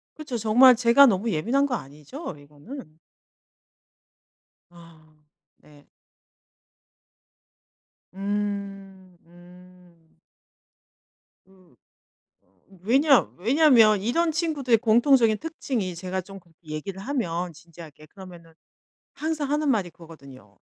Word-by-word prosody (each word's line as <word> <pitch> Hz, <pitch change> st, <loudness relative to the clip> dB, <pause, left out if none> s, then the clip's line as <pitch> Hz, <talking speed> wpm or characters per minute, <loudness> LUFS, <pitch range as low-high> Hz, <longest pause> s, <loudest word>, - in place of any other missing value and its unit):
그쵸. 295 Hz, -6 st, -6 dB
정말 245 Hz, +4 st, +5 dB
제가 240 Hz, +4 st, +5 dB
너무 220 Hz, -1 st, +1 dB
예민한 240 Hz, -, 0 dB
거 260 Hz, -, -2 dB
아니죠, 150 Hz, -, -9 dB
이거는? 155 Hz, -, -13 dB, 1.7 s
아 165 Hz, -2 st, -19 dB, 0.4 s
네. 145 Hz, -1 st, -22 dB, 2.2 s
음 195 Hz, -2 st, -6 dB
음. 175 Hz, -1 st, -20 dB, 1.3 s
으 185 Hz, -3 st, -25 dB, 0.7 s
어 90 Hz, 0 st, -38 dB, 0.2 s
왜냐 270 Hz, +5 st, +4 dB, 0.2 s
왜냐면 230 Hz, -, +4 dB
이런 320 Hz, +9 st, 0 dB
친구들의 295 Hz, -8 st, 0 dB
공통적인 230 Hz, 0 st, +3 dB
특징이 260 Hz, -, -4 dB
제가 185 Hz, +2 st, -5 dB
좀 195 Hz, +2 st, -12 dB
그렇게 170 Hz, -2 st, -25 dB
얘기를 170 Hz, +6 st, -7 dB
하면 180 Hz, -9 st, -3 dB
진지하게 160 Hz, -2 st, -15 dB
그러면은 175 Hz, -2 st, -14 dB, 0.6 s
항상 305 Hz, -2 st, -4 dB
하는 300 Hz, -1 st, 0 dB
말이 205 Hz, -8 st, 0 dB
그거거든요. 140 Hz, -, -16 dB
195 Hz, 210 characters per minute, -24 LUFS, 170-250 Hz, 2.2 s, 정말